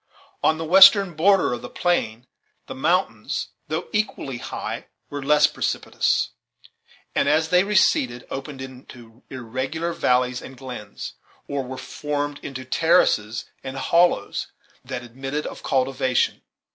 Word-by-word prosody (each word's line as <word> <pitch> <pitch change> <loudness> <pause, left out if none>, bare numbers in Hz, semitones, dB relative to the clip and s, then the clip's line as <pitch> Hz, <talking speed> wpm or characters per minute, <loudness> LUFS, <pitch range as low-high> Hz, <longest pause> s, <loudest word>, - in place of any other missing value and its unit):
On 155 - +3
the 160 - -4
western 195 +2 +8
border 185 -3 +3
of 120 - -4
the - - -8
plain, 125 -10 -1 0.4
the - - -7
mountains, 170 +8 0 0.2
though - - -3
equally 200 - -2
high, - - -5 0.2
were 145 0 -4
less 150 +2 +5
precipitous, - - 0 0.8
and - - +2
as 160 +1 +2
they 180 +2 +5
receded 130 -11 +2
opened 135 0 -6
into 125 -2 -13
irregular 130 +7 -3
valleys 125 -2 +1
and 130 - -11
glens, 130 -1 -8 0.3
or 140 -1 -2
were 130 +1 -7
formed 145 +1 -4
into 130 -2 -7
terraces 120 -8 +2 0.2
and 130 0 -6
hollows 170 -6 +2 0.4
that 125 -1 -5
admitted 135 +5 -5
of - - -7
cultivation. 130 -1 +1
135 Hz, 130 wpm, -23 LUFS, 125-160 Hz, 0.8 s, western